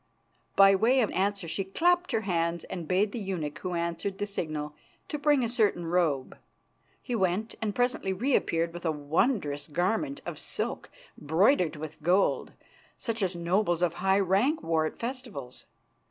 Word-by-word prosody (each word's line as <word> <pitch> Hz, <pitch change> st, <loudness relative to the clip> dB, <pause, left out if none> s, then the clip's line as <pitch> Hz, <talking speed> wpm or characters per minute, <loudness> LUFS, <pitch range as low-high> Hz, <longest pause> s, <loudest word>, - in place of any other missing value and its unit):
By 195 Hz, 0 st, +7 dB
way 235 Hz, +7 st, +4 dB
of 220 Hz, -, +1 dB
answer 195 Hz, -1 st, -1 dB
she 195 Hz, +4 st, -2 dB
clapped 350 Hz, -, +2 dB
her 220 Hz, -, +1 dB
hands 170 Hz, -4 st, -1 dB
and 175 Hz, -4 st, -6 dB
bade 195 Hz, +4 st, +2 dB
the 235 Hz, -, -4 dB
eunuch 165 Hz, -7 st, -4 dB
who 180 Hz, -1 st, -3 dB
answered 170 Hz, +3 st, -2 dB
the 205 Hz, -, -1 dB
signal 155 Hz, -7 st, -4 dB, 0.4 s
to 300 Hz, -, -3 dB
bring 290 Hz, -3 st, +3 dB
a -, -, +1 dB
certain 215 Hz, -7 st, +1 dB
robe. 165 Hz, -6 st, 0 dB, 0.6 s
He 250 Hz, -, -4 dB
went, 200 Hz, +1 st, 0 dB
and 210 Hz, -2 st, -2 dB
presently 245 Hz, -6 st, 0 dB
reappeared 185 Hz, -7 st, +1 dB
with 175 Hz, -, -8 dB
a 165 Hz, -, +1 dB
wondrous 150 Hz, -, 0 dB
garment 220 Hz, -, -1 dB
of -, -, -5 dB
silk -, -, -3 dB, 0.3 s
broidered 170 Hz, -, +3 dB
with 155 Hz, +1 st, -8 dB
gold, 180 Hz, +5 st, +2 dB, 0.4 s
such 230 Hz, -1 st, -3 dB
as 185 Hz, -2 st, 0 dB
nobles 175 Hz, 0 st, +1 dB
of 170 Hz, -2 st, +2 dB
high 190 Hz, +1 st, +3 dB
rank 200 Hz, -, +2 dB
wore 160 Hz, -1 st, +1 dB
at -, -, -8 dB
festivals. 230 Hz, -, -6 dB
190 Hz, 165 wpm, -28 LUFS, 165-220 Hz, 0.6 s, By